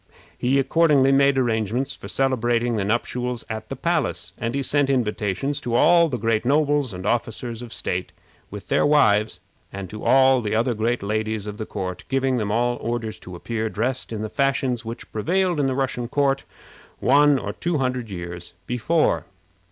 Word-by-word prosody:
He 130 +3 +1
accordingly 140 -1 +4
made 140 0 +4
arrangements 120 +2 0
for - - -10
celebrating 120 -3 +1
the 105 - 0
nuptials 120 +3 -2
at 110 0 -6
the 135 - -4
palace, 165 +2 -1
and 115 +2 -2
he 140 - -1
sent 145 +1 +1
invitations 125 +2 -1
to 120 -1 -2
all 170 +6 +5
the 125 - -2
great 115 0 0
nobles 145 -1 +2
and 90 0 -7
officers 115 +1 -2
of 120 -2 -9
state, 90 -4 -3 0.4
with - - -9
their - - +3
wives, 110 -10 +3 0.3
and 95 -2 -7
to 105 - -8
all 130 -1 +5
the 110 -1 -2
other 120 +2 +1
great 115 +1 -1
ladies 110 0 -2
of 105 +1 -7
the 110 - -4
court, 95 -3 -5
giving 135 -1 +1
them 105 -3 -1
all 120 +2 +1
orders 115 -2 -3
to 90 - -10
appear 110 +4 -3
dressed 125 +5 -2
in 110 -1 -4
the - - -2
fashions 130 -1 0
which 115 +1 -8
prevailed 175 - 0
in 140 - +2
the 130 - -1
Russian 130 -3 -2
court 135 +1 +1 0.5
one 145 +2 +4
or - - -4
two 170 -2 -1
hundred 125 -4 -2
years 85 -2 -7
before. 125 +8 +1
120 Hz, 180 wpm, -23 LUFS, 110-135 Hz, 0.5 s, all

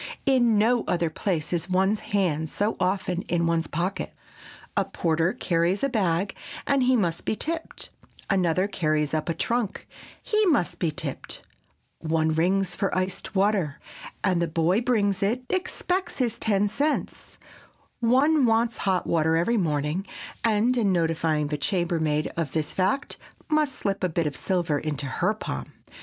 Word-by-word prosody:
In 240 -5 +4
no 230 +3 +3
other 170 -2 +1
place 170 -4 -2
is 175 +1 -2
one's 190 +3 +2
hand 165 -6 0
so 205 +7 -1
often 185 -1 0
in 170 -1 +1
one's 165 -1 +1
pocket. 175 +6 -3 0.6
A - - +3
porter 165 +1 0
carries 175 +4 0
a 275 - +2
bag, 195 -5 0 0.3
and 275 -1 +2
he 255 0 +4
must 170 -6 0
be - - 0
tipped; 325 +7 -3 0.4
another 185 -1 +2
carries 155 -6 0
up 155 +1 -1
a 165 - 0
trunk, 235 +3 -1 0.4
he 430 0 +2
must 285 - +1
be 170 - +1
tipped; 150 - -5 0.6
one 160 0 +1
rings 185 +3 +1
for 195 -2 -1
iced 185 +2 -3
water, 190 -7 +1 0.4
and 185 -3 +2
the 170 - +1
boy 165 +6 +2
bringing 215 -5 +2
it 230 +6 0
expects 370 0 -1
his 245 -4 -1
ten 205 -2 +2
cents; 285 +9 -2 0.6
one 265 +4 +4
wants 230 +1 +2
hot 190 -2 0
water 160 -1 +2
every 175 +9 +2
morning, 155 +1 -1 0.4
and 230 +2 +2
in 210 -5 +3
notifying 165 -3 +1
the 150 -1 -2
chambermaid 160 -2 0
of 160 -5 -2
this 155 -2 -1
fact, 195 +9 0 0.3
must 305 -3 +2
slip 195 -1 -2
a 185 - +2
bit 165 0 0
of 145 -2 -2
silver 175 -6 0
into 145 -2 -3
her 130 - 0
palm. 65 -1 -5
185 Hz, 155 wpm, -26 LUFS, 165-220 Hz, 0.6 s, In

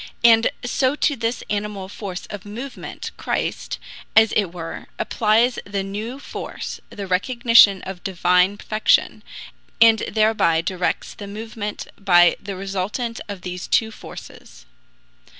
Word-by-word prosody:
And 230 0 +6 0.2
so 260 +3 +1
to 295 -1 +1
this 230 0 -2
animal 205 -2 -3
force 190 -2 -6
of 205 -3 -7
movement 240 +6 -7
Christ, - - -2 0.4
as 220 0 +6
it 210 - +2
were, 170 -2 -7
applies 230 +3 +2
the 200 -1 -3
new 210 +6 -5
force 280 - -7
the 200 - -6
recognition 215 +1 +5
of 190 -1 -7
Divine 180 +1 +2
perfection 215 +1 +1 0.6
and 225 -1 +7
thereby 215 -7 +3
directs 180 +1 -2
the 200 - -9
movement 210 0 -6
by 175 -3 +5
the 200 -1 -6
resultant 195 +5 -3
of 200 -3 -6
these 180 -1 -6
two 225 -1 +2
forces.. - - -12
205 Hz, 130 wpm, -22 LUFS, 190-225 Hz, 0.6 s, and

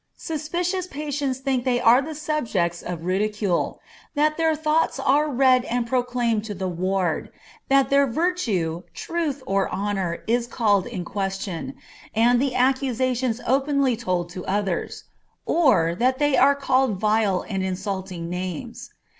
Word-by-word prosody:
Suspicious 350 +4 -2
patients 290 -4 -3
often - - -28
think 260 -3 +1
they 250 -1 +1
are 240 +3 +6
the 310 +2 -6
subjects 240 - -1
of 170 -2 -6
ridicule; 200 0 0 0.4
that 305 +1 +2
their 320 -1 +2
thoughts 305 -1 +1
are 290 +3 +2
read 255 -2 +4
and 245 0 -1
proclaimed 245 -3 0
to 210 -2 -5
the 190 0 -3
ward; 185 -1 -1 0.4
that 275 -1 +3
their 280 0 +5
virtue, 230 - -1
truth, 310 -5 -3
or 195 -4 0
honor 195 -4 -2
is 235 +1 +1
called 205 -6 +1
in 190 -8 -5
question, 195 +4 -4 0.4
and 240 +2 +4
the 270 -2 0
accusations 255 -2 +1
openly 275 -1 +2
told 180 -6 -2
to 180 0 -7
others, 195 -2 -2 0.4
or 255 - +3
that 255 +8 +1
they 290 -1 +2
are 280 +2 +5
called 265 -4 +1
vile 210 -3 +1
and 195 -3 -2
insulting 190 -2 -4
names. 185 +7 -5
240 Hz, 145 wpm, -24 LUFS, 195-275 Hz, 0.4 s, are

